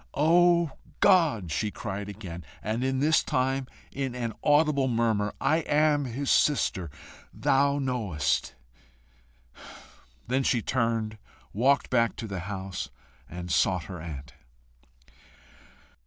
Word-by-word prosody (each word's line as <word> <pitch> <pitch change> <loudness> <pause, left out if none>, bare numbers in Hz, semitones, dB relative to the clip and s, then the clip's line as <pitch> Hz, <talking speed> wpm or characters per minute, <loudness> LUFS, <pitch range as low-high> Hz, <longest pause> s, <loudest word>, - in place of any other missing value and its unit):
"O 170 +1 +4 0.3
God," 155 - +3
she 105 +8 -1
cried 100 -2 -5
again, 90 -4 -8 0.2
and 110 +3 -2
this 130 +4 +2
time 130 +1 -1 0.2
in 135 -2 -3
an 120 -2 -3
audible 145 -2 +3
murmur, 115 -4 +1
"I 155 - +2
am 150 -2 +2
his 130 +3 -2
sister, 95 - +2 0.4
thou 140 +1 +2
knowest!" 100 - -1 1.7
Then 130 +3 0
she 120 -4 +1
turned, 115 -3 -1 0.3
walked 135 +6 +2
back 115 -2 +2
to 115 - -6
the 100 -4 -5
house, 95 -2 -5 0.4
and 90 +1 -6
sought 90 -1 +2
her 90 -2 -8
aunt. 70 -5 -8
120 Hz, 110 wpm, -27 LUFS, 100-140 Hz, 1.7 s, O